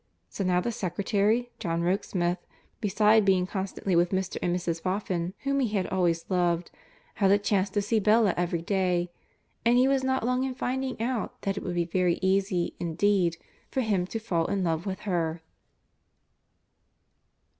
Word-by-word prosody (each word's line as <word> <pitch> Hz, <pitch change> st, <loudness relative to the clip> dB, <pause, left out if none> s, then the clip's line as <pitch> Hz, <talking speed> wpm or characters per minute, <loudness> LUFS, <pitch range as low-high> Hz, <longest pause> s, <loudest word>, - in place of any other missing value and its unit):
So 200 Hz, -, -4 dB
now 180 Hz, -1 st, +2 dB
the 235 Hz, +6 st, -1 dB
secretary, 210 Hz, +4 st, 0 dB
John 170 Hz, -4 st, -1 dB
Rokesmith, 175 Hz, -1 st, 0 dB, 0.4 s
beside 215 Hz, +1 st, +4 dB
being 190 Hz, -2 st, +3 dB
constantly 190 Hz, -1 st, -2 dB
with 175 Hz, +1 st, +4 dB
Mr. 190 Hz, -1 st, -2 dB
and 175 Hz, 0 st, +1 dB
Mrs. 170 Hz, -2 st, -2 dB
Boffin, 185 Hz, -1 st, -2 dB
whom 275 Hz, 0 st, +1 dB
he 260 Hz, -, +2 dB
had 185 Hz, -, 0 dB
always 175 Hz, -3 st, +1 dB
loved, 175 Hz, -2 st, 0 dB, 0.5 s
had 195 Hz, -, +5 dB
a 200 Hz, -, +6 dB
chance 205 Hz, -1 st, +1 dB
to 205 Hz, +1 st, -1 dB
see 220 Hz, +2 st, +1 dB
Bella 215 Hz, -1 st, +4 dB
every 170 Hz, -1 st, -1 dB
day, 180 Hz, -2 st, 0 dB, 0.5 s
and 235 Hz, +1 st, +4 dB
he 255 Hz, +1 st, +5 dB
was 270 Hz, -1 st, +2 dB
not 260 Hz, -2 st, 0 dB
long 250 Hz, +1 st, +1 dB
in 265 Hz, -1 st, -3 dB
finding 260 Hz, 0 st, -2 dB
out 235 Hz, 0 st, -2 dB
that 195 Hz, 0 st, -1 dB
it 200 Hz, -, -4 dB
would 175 Hz, -2 st, -4 dB
be 170 Hz, -1 st, +1 dB
very 175 Hz, 0 st, +1 dB
easy, 190 Hz, -2 st, +1 dB
indeed, 175 Hz, 0 st, +1 dB, 0.3 s
for 265 Hz, -, -1 dB
him 200 Hz, -6 st, 0 dB
to 225 Hz, -, -4 dB
fall 175 Hz, -7 st, -1 dB
in 195 Hz, -2 st, -1 dB
love 165 Hz, +2 st, -1 dB
with 190 Hz, -1 st, -4 dB
her. 165 Hz, -4 st, -2 dB
190 Hz, 170 wpm, -27 LUFS, 175-215 Hz, 0.5 s, a